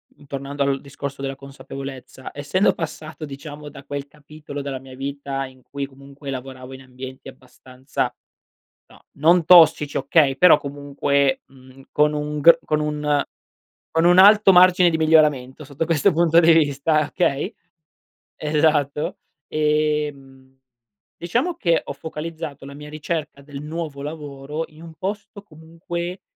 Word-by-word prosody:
mhmm, 145 Hz, -, -20 dB
tornando 140 Hz, +1 st, -3 dB
al 140 Hz, -1 st, 0 dB
discorso 140 Hz, 0 st, -7 dB
della 135 Hz, 0 st, -3 dB
consapevolezza, 135 Hz, -1 st, -9 dB
essendo 145 Hz, +8 st, +1 dB
passato 155 Hz, -1 st, -6 dB
diciamo 145 Hz, +1 st, -9 dB
da 140 Hz, -1 st, -11 dB
quel 140 Hz, 0 st, -6 dB
capitolo 150 Hz, 0 st, -10 dB
della 140 Hz, -1 st, -5 dB
mia 130 Hz, 0 st, -13 dB
vita 135 Hz, 0 st, -4 dB
in 130 Hz, -1 st, -15 dB
cui 140 Hz, +2 st, -5 dB
comunque 140 Hz, +1 st, -12 dB
lavoravo 130 Hz, -1 st, -7 dB
in 130 Hz, -, -10 dB
ambienti 130 Hz, +1 st, -10 dB
abbastanza 130 Hz, 0 st, -6 dB, 0.7 s
no, -, -, -20 dB
non 165 Hz, +3 st, +4 dB
tossici 160 Hz, -4 st, +6 dB
okay, 140 Hz, 0 st, +3 dB
però 170 Hz, +1 st, +7 dB
comunque, 140 Hz, -1 st, -1 dB
mhmm, 130 Hz, 0 st, -18 dB
con 150 Hz, 0 st, +3 dB
un 150 Hz, 0 st, -3 dB
gr 165 Hz, +2 st, +8 dB
con 155 Hz, -, 0 dB
un 150 Hz, -1 st, 0 dB, 0.7 s
con 165 Hz, +1 st, +2 dB
un 175 Hz, +1 st, +5 dB
alto 205 Hz, +1 st, +8 dB
margine 180 Hz, -1 st, +6 dB
di 160 Hz, -, 0 dB
miglioramento, 150 Hz, -4 st, +2 dB
sotto 145 Hz, +3 st, -3 dB
questo 165 Hz, +4 st, +2 dB
punto 165 Hz, 0 st, +3 dB
di 170 Hz, 0 st, +7 dB
vista, 155 Hz, 0 st, +2 dB
okay 165 Hz, +3 st, -1 dB, 0.9 s
Esatto. 150 Hz, -1 st, +1 dB, 0.4 s
Ehm, 150 Hz, -3 st, -1 dB, 0.6 s
diciamo 245 Hz, -, -1 dB
che 170 Hz, -, +1 dB
ho -, -, -6 dB
focalizzato 155 Hz, -1 st, -7 dB
la 140 Hz, -, -10 dB
mia 150 Hz, +1 st, -10 dB
ricerca 155 Hz, -1 st, -4 dB
del 140 Hz, 0 st, -9 dB
nuovo 150 Hz, -2 st, -5 dB
lavoro 150 Hz, 0 st, -6 dB
in 155 Hz, +1 st, -16 dB
un 165 Hz, -1 st, -10 dB
posto 200 Hz, +3 st, -6 dB
comunque 170 Hz, +1 st, -7 dB
150 Hz, 140 wpm, -22 LUFS, 140-160 Hz, 0.9 s, gr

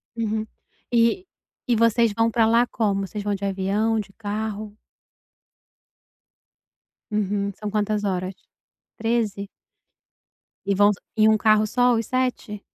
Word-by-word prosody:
Uhum. 220 Hz, -1 st, -2 dB, 0.5 s
E 235 Hz, +10 st, +2 dB, 0.4 s
e 240 Hz, -, +3 dB
vocês 230 Hz, 0 st, +3 dB
vão 225 Hz, 0 st, +3 dB
pra 225 Hz, -1 st, +3 dB
lá 235 Hz, +2 st, +4 dB
como? 200 Hz, -5 st, -1 dB
Vocês 205 Hz, +1 st, -6 dB
vão 205 Hz, -1 st, -1 dB
de 200 Hz, +1 st, -5 dB
avião, 200 Hz, +3 st, 0 dB
de 200 Hz, -1 st, -6 dB
carro? 210 Hz, 0 st, -4 dB, 2.4 s
Uhum, 200 Hz, -1 st, -1 dB
são 210 Hz, -1 st, -5 dB
quantas 210 Hz, 0 st, 0 dB
horas? 185 Hz, -1 st, -2 dB, 0.6 s
13? 220 Hz, -3 st, -1 dB, 1.2 s
E 200 Hz, -1 st, +1 dB
vão 205 Hz, +1 st, +5 dB
só -, -, -13 dB, 0.2 s
em 215 Hz, 0 st, +5 dB
um 220 Hz, -, +4 dB
carro 215 Hz, 0 st, +4 dB
só 245 Hz, +2 st, +2 dB
os 225 Hz, -1 st, -1 dB
7? 250 Hz, -5 st, -2 dB
215 Hz, 130 wpm, -23 LUFS, 205-230 Hz, 2.4 s, vão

